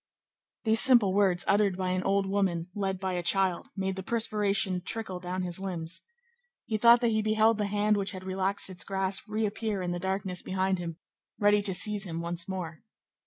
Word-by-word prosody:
These 220 -1 +4
simple 240 -8 +6
words 190 -3 +2
uttered 200 -2 +2
by 185 -1 -1
an 185 0 0
old 195 +1 +1
woman 190 -3 -1
led 195 -2 -2
by 190 -1 -2
a 175 - -1
child 185 +1 +2
made 190 0 -2
the 190 - -5
perspiration 205 -4 0
trickle 205 -4 -3
down 180 +1 -4
his 175 0 -4
limbs. 180 -2 -5 0.6
He 215 -1 -2
thought 235 +2 +6
that 235 - +2
he 220 0 +1
beheld 215 +1 +2
the 205 - 0
hand 210 +1 +1
which 200 0 -1
had 185 -1 -8
relaxed 190 +1 0
its 180 - -2
grasp 190 0 -1
reappear 215 -1 -2
in 175 - -2
the 175 - -3
darkness 190 0 -2
behind 190 0 -1
him, 165 -2 -6 0.4
ready 205 0 +3
to 200 -2 -2
seize 210 0 0
him 165 -2 -5
once 170 +1 -3
more. 175 -4 -5
190 Hz, 195 wpm, -28 LUFS, 185-210 Hz, 0.6 s, simple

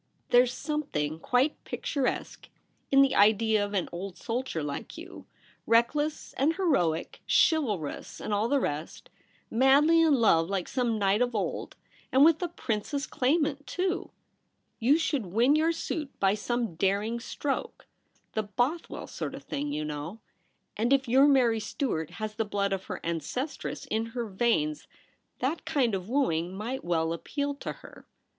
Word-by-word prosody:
There's 245 0 +6
some 300 +4 -2
thing 150 - -3
quite 250 - +1
picturesque 275 -3 -3 0.4
in 275 0 +7
the 270 - +2
idea 215 +1 +4
of 205 0 -4
an 185 - 0
old 180 +1 -6
soldierlike 170 - -4
you, - - -10 0.4
reckless 295 +7 +1
and 305 +5 +3
heroic, 180 - 0
chivalrous 215 - +1
and 210 - -3
all 205 +2 +1
the 280 +2 +2
rest, 150 - -4 0.4
madly 280 +7 +5
in 315 -3 +5
love 175 -9 +3
like 195 -3 -2
some 240 -4 0
knight 200 +2 +2
of 245 -1 +1
old 205 - -3 0.2
— - - -30
and 270 +3 +6
with 320 +1 +4
a 355 - 0
princess 280 -2 -3
claimant, 290 +1 0
too! 370 +1 -2 0.7
You 260 +6 +4
should 290 - -1
win 235 +10 +3
your 320 +2 +3
suit 310 -3 -4
by 195 0 +3
some 230 -1 -2
daring 200 +7 0
stroke 275 +4 -4 0.2
— - - -40
the 220 - +1
Bothwell 245 +10 -2
sort 155 -4 -5
of - - -10
thing, 145 +1 -3
you 150 +1 -2
know; 150 +7 -5 0.6
and 230 +4 0
if 275 -1 +3
your 265 +4 +6
Mary 245 -5 +4
Stuart 210 - -2
has 215 -1 -4
the 225 +1 -1
blood 200 -1 -1
of 190 0 -3
her - - -6
ancestress 170 - -4
in 225 -3 -1
her 240 - -1
veins, 190 -8 0 0.5
that 285 +6 -1
kind 250 -7 +1
of 190 +1 -3
wooing 180 - 0
might 240 +6 -4
well 165 -1 0
appeal 285 - -3
to 280 - -6
her. - - -14
230 Hz, 160 wpm, -28 LUFS, 195-280 Hz, 0.7 s, in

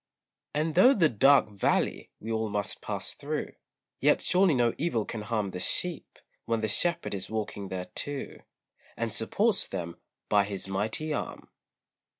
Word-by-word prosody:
And 155 +1 0
though 245 - +6
the 165 -6 +4
"dark 135 +2 +5
valley" 100 - 0
we 115 - -6
all 110 -1 -1
must 105 -1 -3
pass - - -3
through, - - -4 0.5
Yet - - +4
surely 180 -4 +3
no 120 -2 +2
evil 135 -9 0
can 110 - -5
harm 105 -2 -1
The 90 - -6
sheep, 175 - -1 0.3
when 115 -1 0
the 110 - 0
Shepherd 170 +10 +1
is 95 -2 -2
walking 105 -2 -4
there 95 -1 -4
too, 145 +6 -3 0.6
And 115 -2 -2
supports 200 - +1
them 85 -3 -5 0.3
by 100 -1 +4
his 100 -2 -4
mighty 110 +11 -1
arm. - - -5
110 Hz, 155 wpm, -28 LUFS, 100-155 Hz, 0.6 s, though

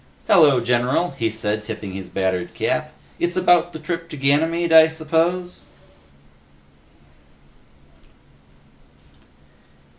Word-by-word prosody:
"Hello, 150 -9 +5
general," 125 +8 0
he 115 -5 -2
said, 105 -1 -3
tipping 105 -3 -7
his 95 -1 -8
battered 95 -2 -3
cap. - - -2 0.3
"It's 175 +1 -1
about 175 -1 +3
the - - -8
trip 165 +1 -6
to 155 - -8
Ganymede, 160 +5 +1
I 160 0 +8
suppose?" 165 +3 -2
155 Hz, 95 wpm, -21 LUFS, 115-170 Hz, 0.3 s, I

